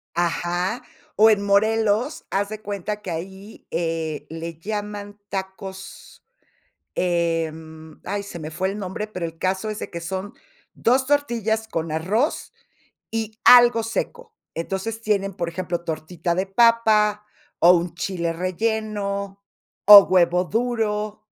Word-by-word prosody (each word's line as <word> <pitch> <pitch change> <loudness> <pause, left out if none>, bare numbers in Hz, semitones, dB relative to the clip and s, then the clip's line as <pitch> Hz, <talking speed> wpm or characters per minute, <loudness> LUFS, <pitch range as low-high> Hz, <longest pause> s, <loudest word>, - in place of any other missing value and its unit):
Ajá, 175 +5 -1 0.3
o 220 +2 +7
en 205 -2 +2
Morelos, 220 +6 +1
haz 200 +1 0
de 215 0 -7
cuenta 205 +1 -4
que 190 - -5
ahí, 190 +5 -8
eh, 165 -2 -2
le 165 0 -6
llaman 205 +1 -5
tacos, 190 0 -8 0.7
em, 160 -2 -2
ay, 200 +2 -3
se 200 -3 -8
me 155 -1 -6
fue 185 +4 -2
el 205 - -6
nombre, 195 +2 -4
pero 185 -5 -4
el 165 0 -10
caso 190 +4 -1
es 215 - -5
de - - -6
que 170 - -6
son 190 +5 -5 0.4
2 260 +3 +2
tortillas 230 -6 0
con 165 -4 -3
arroz 205 - -1 0.6
y 220 -1 -4
algo 240 -2 +8
seco, 450 - -4 0.2
entonces, 195 +6 -4
tienen, 200 -3 0
por 170 -3 -3
ejemplo, 175 0 -3
tortita 165 +2 -3
de 190 +2 -1
papa 215 -1 +3 0.4
o 175 +2 +8
un 170 -1 0
chile 170 -2 -2
relleno 200 +1 -2 0.4
o 205 -1 +12
huevo 180 -1 +3
duro, 215 -1 -1
195 Hz, 135 wpm, -23 LUFS, 175-215 Hz, 0.7 s, o